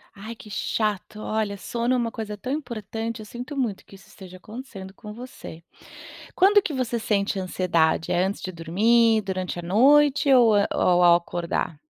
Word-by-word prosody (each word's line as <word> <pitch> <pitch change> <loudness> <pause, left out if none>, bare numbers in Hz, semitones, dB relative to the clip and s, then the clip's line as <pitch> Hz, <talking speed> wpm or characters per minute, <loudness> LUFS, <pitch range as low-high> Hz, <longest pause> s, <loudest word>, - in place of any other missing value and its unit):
Ai 215 +3 -8
que 215 - -14
chato, 210 0 -2
olha, 215 -2 -2
o - - -11
sono 235 +4 -2
é - - +1
uma 235 -2 -1
coisa 215 -2 -6
tão 255 +6 -5
importante. 230 -5 -4
Eu - - -9
sinto 245 +6 -8
muito 230 -7 -2
que - - -15
isso 195 - -18
esteja 185 -2 -13
acontecendo 205 -2 -10
com 210 +1 -10
você. 225 -8 -10 0.7
Quando 405 +3 +5
que 335 - -4
você 245 -2 -1
sente 205 -2 -1
ansiedade, 180 -2 0
é 175 +1 +2
antes 195 +1 -3
de 185 - -5
dormir 220 +7 +3
durante 185 -2 -4
a - - -5
noite 275 - +4
ou, 235 -5 +6
eh 200 - +3
ou 180 0 +3
ao 175 -1 +7
acordar? 170 -2 -2
210 Hz, 185 wpm, -24 LUFS, 185-235 Hz, 0.7 s, ao